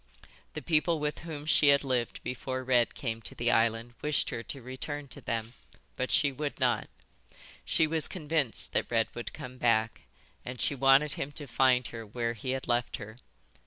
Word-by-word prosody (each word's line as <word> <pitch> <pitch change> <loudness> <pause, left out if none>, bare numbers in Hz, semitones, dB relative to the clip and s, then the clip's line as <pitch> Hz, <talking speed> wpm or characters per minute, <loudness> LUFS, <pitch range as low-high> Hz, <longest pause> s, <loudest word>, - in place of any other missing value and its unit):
The - - -5
people 165 0 +2
with 150 0 -2
whom 155 -3 -7
she 150 -1 +5
had 140 0 +6
lived 125 -3 -1
before 130 +1 -3
Red 125 -2 +2
came 115 -3 -3
to 100 - -6
the 120 0 +1
island 115 +1 +2
wished 150 0 0
her 115 - -3
to 135 - -7
return 135 +3 -5
to - - -5
them, 115 -1 -3 0.4
but 130 - -2
she 145 -2 +4
would 145 +2 -4
not; - - +1 0.8
she 160 - +3
was 160 -1 +1
convinced 155 -7 -1
that - - 0
Red 115 -1 +2
would 120 - -5
come 125 0 -9
back, 115 -2 +2 0.4
and 125 0 -6
she - - +2
wanted 135 +2 +5
him 140 - -4
to 145 0 -3
find 130 -1 +3
her 115 -1 -7
where 115 +2 -2
he 120 +3 -6
had 130 0 -2
left 120 -1 0
her. 110 +2 -9
130 Hz, 190 wpm, -30 LUFS, 120-145 Hz, 0.8 s, had